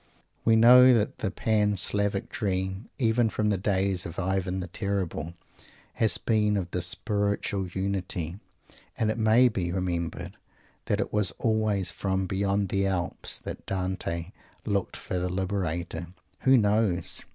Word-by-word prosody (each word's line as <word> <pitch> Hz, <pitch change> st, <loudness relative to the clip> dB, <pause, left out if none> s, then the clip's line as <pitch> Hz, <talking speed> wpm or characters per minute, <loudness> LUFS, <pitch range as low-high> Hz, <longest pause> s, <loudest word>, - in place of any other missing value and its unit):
We 115 Hz, -, +4 dB
know 125 Hz, +2 st, +8 dB
that 110 Hz, -2 st, -1 dB
the 105 Hz, -, -1 dB
Pan 105 Hz, 0 st, +1 dB
Slavic 100 Hz, +1 st, +1 dB
dream, 95 Hz, 0 st, -3 dB
even 115 Hz, -1 st, +2 dB
from 105 Hz, 0 st, 0 dB
the -, -, +2 dB
days 95 Hz, -2 st, 0 dB
of 85 Hz, -, -7 dB
Ivan 95 Hz, 0 st, -1 dB
the 90 Hz, -, -3 dB
Terrible, 95 Hz, -6 st, -3 dB, 0.6 s
has 110 Hz, -, +2 dB
been 105 Hz, -2 st, +1 dB
of 90 Hz, -3 st, -3 dB
this 90 Hz, -1 st, -1 dB
spiritual 100 Hz, 0 st, -1 dB
unity, 95 Hz, -2 st, -3 dB, 0.6 s
and 110 Hz, -1 st, +1 dB
it -, -, -4 dB
may 110 Hz, +3 st, +5 dB
be 95 Hz, -7 st, -2 dB
remembered 85 Hz, -2 st, -3 dB, 0.5 s
that 105 Hz, -, 0 dB
it -, -, -4 dB
was 105 Hz, -2 st, +2 dB
always 110 Hz, -5 st, 0 dB
from 95 Hz, -1 st, -1 dB
"beyond 100 Hz, +1 st, 0 dB
the 100 Hz, +1 st, +1 dB
Alps" 90 Hz, -3 st, -1 dB
that -, -, -8 dB
Dante 90 Hz, -2 st, -3 dB, 0.3 s
looked 100 Hz, -3 st, -1 dB
for 90 Hz, -, -3 dB
the 90 Hz, +1 st, -2 dB
Liberator. 90 Hz, -3 st, -3 dB, 0.3 s
Who 130 Hz, 0 st, +5 dB
knows? 105 Hz, -5 st, +1 dB
95 Hz, 145 wpm, -27 LUFS, 90-105 Hz, 0.6 s, know